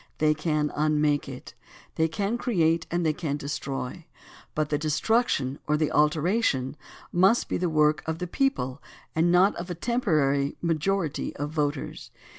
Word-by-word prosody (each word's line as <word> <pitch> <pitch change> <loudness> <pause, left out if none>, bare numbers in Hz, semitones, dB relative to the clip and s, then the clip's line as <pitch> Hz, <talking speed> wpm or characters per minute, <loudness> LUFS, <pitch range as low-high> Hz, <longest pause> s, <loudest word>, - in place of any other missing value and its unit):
They 155 0 +3
can 150 -1 -1
unmake 150 -1 +1
it. 130 -1 -9 0.4
They 160 - +2
can 205 +7 -2
create 165 -9 +1
and 175 0 -1
they 155 - +2
can 150 -3 -3
destroy, 140 +2 -5 0.5
but 155 -1 0
the 150 - 0
destruction 155 - +1
or 150 - +2
the 155 -1 0
alteration 150 - +1 0.4
must 190 +7 +3
be - - -1
the 180 -1 0
work 150 -1 +3
of 160 0 -1
the 180 - -3
people 170 - -1 0.3
and 165 +2 +3
not 185 +3 +4
of 175 +2 -6
a 175 - -3
temporary 155 - +1
majority 170 0 -1
of 145 +1 -4
voters. 150 -2 -3
155 Hz, 155 wpm, -26 LUFS, 150-175 Hz, 0.5 s, not